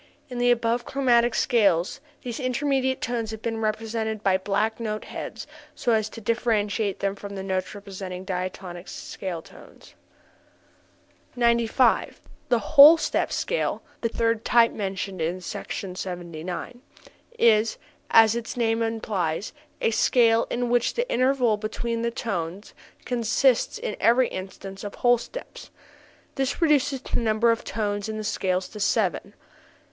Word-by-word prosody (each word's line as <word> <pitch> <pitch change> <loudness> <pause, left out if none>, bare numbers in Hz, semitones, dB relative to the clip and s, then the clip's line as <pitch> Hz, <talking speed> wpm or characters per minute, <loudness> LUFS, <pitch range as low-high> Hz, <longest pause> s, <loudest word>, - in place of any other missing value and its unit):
In 250 -1 -5
the 245 0 +3
above 235 0 +2
chromatic 245 -3 +2
scales 200 -3 +2 0.2
these 240 0 -5
intermediate 260 0 0
tones 230 -2 -2
have 220 0 -7
been 225 -1 -2
represented 220 0 -2
by 195 -2 +3
black 205 +4 0
note 215 -2 -3
heads - - -7 0.3
so 240 - 0
as 215 -1 +2
to 230 - -9
differentiate 215 -2 0
them 195 0 0
from 200 0 -8
the 190 - -5
notes 190 0 -2
representing 190 -2 -7
diatonic 185 -1 -5
scale 175 -4 -6
tones. - - -16 1.4
95. 235 0 +2 0.3
The 240 - +4
whole 295 +7 +8
step - - -1
scale - - -1 0.2
(the 230 - 0
third 230 -1 0
type 235 -1 +4
mentioned 195 -2 -4
in 170 +3 -1
Sec. 200 +3 -7
79) 180 +3 -5 0.6
is, 220 - +4 0.3
as 225 0 +6
its 235 +1 -5
name 225 -1 +1
implies, 210 -6 -2 0.3
a - - +2
scale 230 0 +3
in 240 0 -1
which 240 -1 +2
the 485 +1 0
intervals 255 -4 +2
between 230 +2 -3
the 235 - 0
tones 195 -4 -4 0.3
consist 245 - +2
in 480 +1 -4
every 245 +2 +4
instance 195 +1 -8
of 205 - -6
whole 245 -1 +3
steps. - - -9 0.6
This 270 -1 -1
reduces 285 -5 +2
the - - -2
number 230 0 +3
of 230 - -1
tones 205 0 -2
in 215 - -4
the 215 - -4
scale 185 -3 0
to 210 +3 -9
seven. 200 - 0
225 Hz, 140 wpm, -25 LUFS, 195-240 Hz, 1.4 s, whole